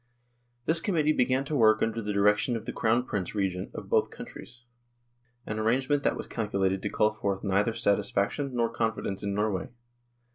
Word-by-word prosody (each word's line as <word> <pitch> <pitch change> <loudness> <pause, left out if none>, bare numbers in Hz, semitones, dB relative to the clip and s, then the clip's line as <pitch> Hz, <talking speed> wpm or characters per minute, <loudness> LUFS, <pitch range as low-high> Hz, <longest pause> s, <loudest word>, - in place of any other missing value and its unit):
This 165 +1 +3
Com 190 +2 -1
mittee 155 -1 +3
began 130 +2 +2
to 150 - -2
work 110 -4 +5
under 115 0 -1
the 105 -1 -3
direction 105 +4 +2
of 115 -1 -5
the 125 - -4
Crown 115 +2 +1
Prince 100 -3 -3
Regent 95 -2 -1
of - - -7
both - - +2
countries, 125 +1 -10 0.8
an 110 0 -3
arrange 125 +5 +1
ment 145 -1 +2
that - - +1
was - - -5
calculated 95 -4 -1
to - - -2
call 105 0 +2
forth 100 -2 -2
neither 100 +3 +1
satis 100 -3 +1
faction 125 +7 -1
nor 120 -1 +2
confidence 110 -4 -2
in 100 -1 -2
Norway. 105 -2 -1
110 Hz, 190 wpm, -28 LUFS, 100-125 Hz, 0.8 s, work